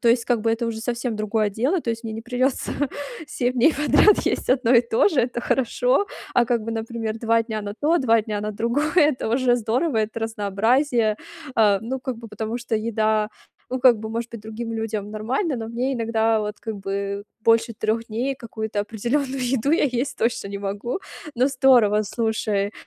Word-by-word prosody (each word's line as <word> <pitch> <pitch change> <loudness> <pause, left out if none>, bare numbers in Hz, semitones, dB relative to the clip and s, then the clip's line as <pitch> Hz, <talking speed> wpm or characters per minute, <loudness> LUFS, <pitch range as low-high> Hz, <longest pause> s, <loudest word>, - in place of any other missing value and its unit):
То 235 - +2
есть, 230 0 +3
как 240 -2 +1
бы, 225 +1 +1
это 230 +1 -1
уже 220 -1 -3
совсем 240 0 -2
другое 215 0 0
дело. 265 - 0
То 235 - -2
есть 230 0 -4
мне 220 - -4
не 225 - -6
придется 255 +2 -1 0.6
7 250 -3 -1
дней 260 +6 +4
подряд 300 - +5
есть - - 0
1 255 -2 +3
и 235 - +8
то 235 - +2
же, 310 -9 +2
это 240 0 -1
хорошо. 255 - +1 0.3
А, 245 - +5
как 235 -2 +1
бы, 230 - -3
например, 225 -1 -4
2 230 0 +3
дня 220 -2 -4
на 205 0 -5
то, 325 +4 +3
2 230 -4 +3
дня 210 -1 -3
на 210 +1 -3
другое- 235 +8 0
это 295 -8 +3
уже 245 +1 +3
здорово, 240 +3 0
это 215 +1 -1
разнообразие. 225 +2 +1 0.4
А, 210 -3 +4
ну, 255 +4 -4
как 255 -2 -4
бы, 230 - -9
потому 220 +2 -4
что 235 -1 -3
еда, 215 -1 +1 0.4
ну, 255 - -1
как 245 -4 +6
бы, 220 - -5
может 230 +1 -3
быть, 230 - -8
другим 220 +2 -6
людям 220 -2 -3
нормально, 260 - -1
но 225 -1 -5
мне 250 +4 -1
иногда 225 -1 +1
вот, 210 0 -4
как 220 -2 -5
бы, 200 +1 -3 0.2
больше 230 0 +3
3 220 +2 -1
дней 245 +5 -1
какую-то 220 -4 -4
определённую 255 +6 -2
еду 265 +2 0
я 330 - +3
есть 260 +1 -1
точно 230 -3 0
не 200 - -5
могу. 205 - -3 0.4
Ну, 250 - +4
здорово, 250 -6 +4
слушай, 215 -2 -1
230 Hz, 200 wpm, -23 LUFS, 220-250 Hz, 0.6 s, и